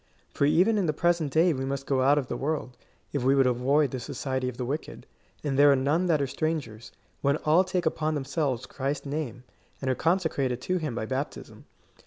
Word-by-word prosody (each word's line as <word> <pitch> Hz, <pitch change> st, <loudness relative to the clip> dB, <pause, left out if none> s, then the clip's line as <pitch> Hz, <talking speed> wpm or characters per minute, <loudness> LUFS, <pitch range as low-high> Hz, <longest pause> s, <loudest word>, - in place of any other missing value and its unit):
For 140 Hz, -, +2 dB
even 180 Hz, +9 st, +4 dB
in 185 Hz, -, 0 dB
the 155 Hz, -, +1 dB
pre 175 Hz, +3 st, +3 dB
sent 160 Hz, -5 st, -4 dB
day 165 Hz, +4 st, +4 dB
we 130 Hz, -1 st, -3 dB
must 135 Hz, 0 st, -3 dB
go 135 Hz, -2 st, +1 dB
out 140 Hz, +3 st, +4 dB
of 145 Hz, -, 0 dB
the -, -, -4 dB
world, 140 Hz, -3 st, -3 dB, 0.4 s
if 140 Hz, -4 st, -1 dB
we 135 Hz, +2 st, +4 dB
would 135 Hz, -1 st, +4 dB
avoid 130 Hz, +3 st, +2 dB
the 130 Hz, -, -3 dB
society 130 Hz, 0 st, -3 dB
of 125 Hz, -, -9 dB
the 125 Hz, -, -3 dB
wicked; 145 Hz, +5 st, -5 dB, 0.4 s
and 140 Hz, -2 st, -1 dB
there 145 Hz, 0 st, +8 dB
are -, -, +5 dB
none 145 Hz, +7 st, +1 dB
that 160 Hz, -3 st, +3 dB
are 140 Hz, -, +1 dB
strangers, 135 Hz, -6 st, -3 dB, 0.3 s
when 140 Hz, +1 st, +2 dB
all 160 Hz, +4 st, +3 dB
take 185 Hz, -1 st, -2 dB
upon 155 Hz, 0 st, 0 dB
themselves 135 Hz, -2 st, -2 dB
Christ's 140 Hz, +1 st, -3 dB
name, 140 Hz, -4 st, -4 dB, 0.4 s
and 135 Hz, -1 st, -1 dB
are -, -, 0 dB
conse 175 Hz, +3 st, +2 dB
crated 130 Hz, -5 st, -2 dB
to 180 Hz, +5 st, -1 dB
him 150 Hz, -7 st, -3 dB
by 110 Hz, -, -2 dB
baptism." 135 Hz, +5 st, -5 dB
140 Hz, 225 wpm, -27 LUFS, 130-155 Hz, 0.4 s, there